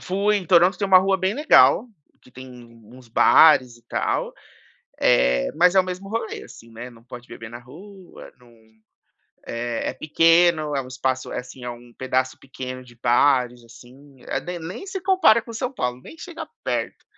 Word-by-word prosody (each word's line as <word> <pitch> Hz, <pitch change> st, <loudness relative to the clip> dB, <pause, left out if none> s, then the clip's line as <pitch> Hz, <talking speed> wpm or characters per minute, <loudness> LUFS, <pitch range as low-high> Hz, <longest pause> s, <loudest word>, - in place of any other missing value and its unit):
Fui, 200 Hz, +3 st, 0 dB
em 185 Hz, -4 st, -5 dB
Toronto 180 Hz, +1 st, +4 dB
tem 200 Hz, -, -1 dB
uma 190 Hz, -1 st, +7 dB
rua 190 Hz, +1 st, +1 dB
bem 190 Hz, +2 st, -1 dB
legal 275 Hz, -4 st, +4 dB, 0.3 s
que 125 Hz, -, -21 dB
tem 130 Hz, +1 st, -11 dB, 0.4 s
uns 125 Hz, +3 st, -16 dB
bares 125 Hz, +1 st, +5 dB
e 120 Hz, -, -23 dB
tal, -, -, -2 dB, 0.7 s
eh, 60 Hz, 0 st, +2 dB
mas 180 Hz, +2 st, +4 dB
é 190 Hz, -, +6 dB
o -, -, 0 dB
mesmo 185 Hz, +1 st, -7 dB
rolê, 225 Hz, +1 st, -5 dB
assim, 115 Hz, -, -15 dB
né, 120 Hz, +2 st, -9 dB
não 115 Hz, -2 st, -18 dB
pode 125 Hz, 0 st, -12 dB
beber 110 Hz, -1 st, -11 dB
na 120 Hz, -, -9 dB
rua, 180 Hz, +9 st, -14 dB
não 120 Hz, -1 st, -21 dB, 0.9 s
eh, 115 Hz, 0 st, -3 dB
é -, -, -10 dB
pequeno, 165 Hz, -1 st, +2 dB
é 135 Hz, -, -1 dB
um 130 Hz, -, -12 dB
espaço 130 Hz, 0 st, -3 dB
assim, 125 Hz, +1 st, -8 dB
é 125 Hz, -, -5 dB
um 120 Hz, 0 st, -13 dB
pedaço 130 Hz, 0 st, -2 dB
pequeno 130 Hz, -1 st, -8 dB
de 120 Hz, -1 st, -18 dB
bares, 125 Hz, 0 st, +1 dB
assim, 130 Hz, +4 st, -17 dB
a -, -, -2 dB
de 180 Hz, 0 st, -6 dB
nem 180 Hz, -, -8 dB
se 385 Hz, -, -5 dB
compara 370 Hz, -, +4 dB
com 230 Hz, -, -11 dB
São 250 Hz, +3 st, -4 dB
Paulo, 125 Hz, -, -4 dB
nem 325 Hz, -, -13 dB
chega 345 Hz, -1 st, -8 dB, 0.2 s
perto. -, -, -3 dB
135 Hz, 185 wpm, -22 LUFS, 125-190 Hz, 0.9 s, uma